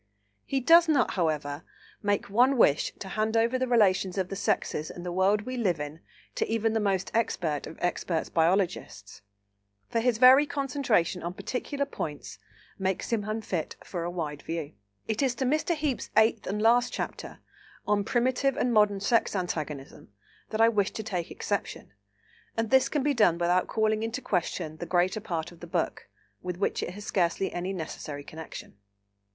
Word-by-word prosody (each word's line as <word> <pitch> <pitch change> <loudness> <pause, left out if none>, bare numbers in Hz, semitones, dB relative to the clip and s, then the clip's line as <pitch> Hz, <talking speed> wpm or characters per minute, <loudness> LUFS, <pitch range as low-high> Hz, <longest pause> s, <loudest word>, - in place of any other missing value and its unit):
He 270 - 0
does 330 +5 +6
not, 280 -6 +3
however, 150 -4 -1 0.4
make 205 -1 0
one 250 +6 +3
wish 150 -10 +4
to 190 - -7
hand 215 +2 0
over 235 +3 +2
the 260 - 0
relations 195 -5 +3
of 190 -1 -1
the 195 - -4
sexes 155 -5 -1
in 175 - -8
the 180 - -4
world 195 +3 +2
we 255 +2 -5
live 185 -9 +1
in 150 +2 -6 0.3
to - - -1
even 225 0 0
the 225 - +1
most 195 -3 0
expert 175 -10 -1
of 160 - -10
expert 175 -2 -1
biologists, 165 - 0 0.7
for 230 - +1
his 235 -1 +2
very 260 +4 +7
concentration 250 - 0
on 175 +1 -5
particular 280 +5 -3
points 150 - -6 0.4
makes 190 +4 -1
him 220 -3 +1
unfit 215 -6 -3
for 175 -3 -5
a 170 - -2
wide 155 -5 -4
view. 165 -2 -5 0.3
It 220 +2 -1
is 260 -3 +1
to 260 - -1
Mr. 310 +5 +1
Heape's 295 -5 -2
eighth 220 0 +3
and 205 +2 -2
last 240 +3 +4
chapter, - - -5 0.5
on 205 -1 +2
"Primitive 255 +4 +1
and 245 - +1
Modern 210 -2 +3
Sex 225 +1 +2
Antagonism," 155 - -4 0.4
that 220 0 -1
I 225 - +7
wish 205 -3 +2
to 220 - -5
take 180 -5 -3
exception, - - -4 0.6
and 225 -1 -1
this 265 -1 +5
can 295 -3 0
be 290 0 +2
done 210 -9 +4
without 175 +1 +2
calling 220 -1 +1
into 225 +4 -2
question 170 - -2
the 175 - -6
greater 180 +4 +1
part 170 -6 -4
of 170 - -16
the 175 - -9
book, - - -2 0.3
with 180 -1 -4
which 195 - -1
it 175 - -5
has 205 0 -8
scarcely 185 +1 0
any 180 +2 -3
necessary 155 -5 -6
connection. 155 -8 -9
200 Hz, 180 wpm, -28 LUFS, 175-235 Hz, 0.7 s, very